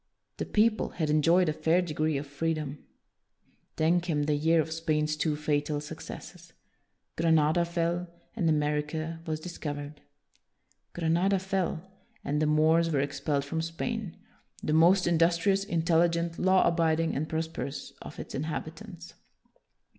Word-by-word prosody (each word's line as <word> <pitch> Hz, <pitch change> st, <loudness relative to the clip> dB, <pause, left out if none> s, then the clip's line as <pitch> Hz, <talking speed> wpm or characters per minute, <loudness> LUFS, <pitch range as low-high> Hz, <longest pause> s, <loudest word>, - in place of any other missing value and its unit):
The -, -, -3 dB
people 215 Hz, +1 st, +2 dB
had 155 Hz, -3 st, 0 dB
enjoyed 165 Hz, +4 st, +4 dB
a 155 Hz, -, +1 dB
fair 160 Hz, +3 st, +2 dB
degree 155 Hz, -3 st, -1 dB
of 140 Hz, -, -4 dB
free 160 Hz, +3 st, -1 dB
dom. 150 Hz, -2 st, -5 dB, 1.0 s
Then 165 Hz, +3 st, +2 dB
came 160 Hz, -4 st, -1 dB
the 150 Hz, +1 st, +1 dB
year 160 Hz, +3 st, +3 dB
of 160 Hz, 0 st, -1 dB
Spain's 155 Hz, -2 st, 0 dB
two 155 Hz, 0 st, 0 dB
fatal 150 Hz, 0 st, -1 dB
successes: 150 Hz, -, -9 dB, 0.6 s
Granada 160 Hz, 0 st, +3 dB
fell, 170 Hz, +1 st, -1 dB, 0.3 s
and 165 Hz, -, +1 dB
America 150 Hz, +2 st, -1 dB
was 155 Hz, -1 st, -2 dB
discovered. 150 Hz, -3 st, -6 dB, 0.9 s
Granada 175 Hz, +4 st, +2 dB
fell, 185 Hz, -3 st, -2 dB, 0.4 s
and 150 Hz, +1 st, 0 dB
the 155 Hz, -, +2 dB
Moors 160 Hz, +2 st, +3 dB
were 145 Hz, -4 st, +1 dB
ex 140 Hz, 0 st, -3 dB
pelled 140 Hz, -1 st, 0 dB
from 160 Hz, +3 st, -2 dB
Spain, 175 Hz, +4 st, -4 dB, 0.5 s
the 155 Hz, -, 0 dB
most 175 Hz, +4 st, +5 dB
industrious, 175 Hz, +3 st, +2 dB
intelligent, 170 Hz, -2 st, +1 dB
law 185 Hz, 0 st, +4 dB
abiding, 165 Hz, -1 st, +1 dB
and 155 Hz, +3 st, -2 dB
prosperous 160 Hz, -3 st, -4 dB
of -, -, -9 dB
its -, -, -8 dB
inhabitants. 165 Hz, +4 st, -6 dB
160 Hz, 140 wpm, -29 LUFS, 150-170 Hz, 1.0 s, most